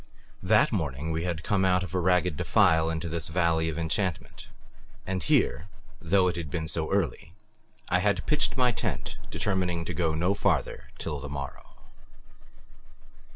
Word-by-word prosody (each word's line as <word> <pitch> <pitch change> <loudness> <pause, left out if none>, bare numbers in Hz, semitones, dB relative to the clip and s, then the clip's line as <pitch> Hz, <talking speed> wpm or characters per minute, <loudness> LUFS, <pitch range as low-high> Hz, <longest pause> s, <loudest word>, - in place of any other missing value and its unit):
That - - +4
morning 75 +1 -2
we 80 +2 -2
had 85 -2 -3
come 100 0 +1
out 90 0 +3
of 95 -2 -7
a 90 - +1
ragged 90 -2 +2
defile 80 +3 +3
into 80 +1 -3
this 80 -1 -2
valley 80 -1 +1
of 80 - -5
enchantment, 85 +1 -3 0.6
and 95 -1 -2
here, 80 +6 +1 0.3
though 90 +2 +3
it 90 - 0
had 80 -4 -4
been 80 -1 -3
so 80 0 -1
early, 85 -3 -1 0.5
I 90 - +2
had 95 +1 +1
pitched 150 -2 +1
my 125 -1 +4
tent, - - -3
determining 90 -4 -1
to - - -4
go 80 -3 0
no 90 +5 +2
farther 100 - -1
till 75 - -4
the 70 +1 -7
morrow. 70 -1 -8
85 Hz, 160 wpm, -27 LUFS, 80-95 Hz, 0.6 s, That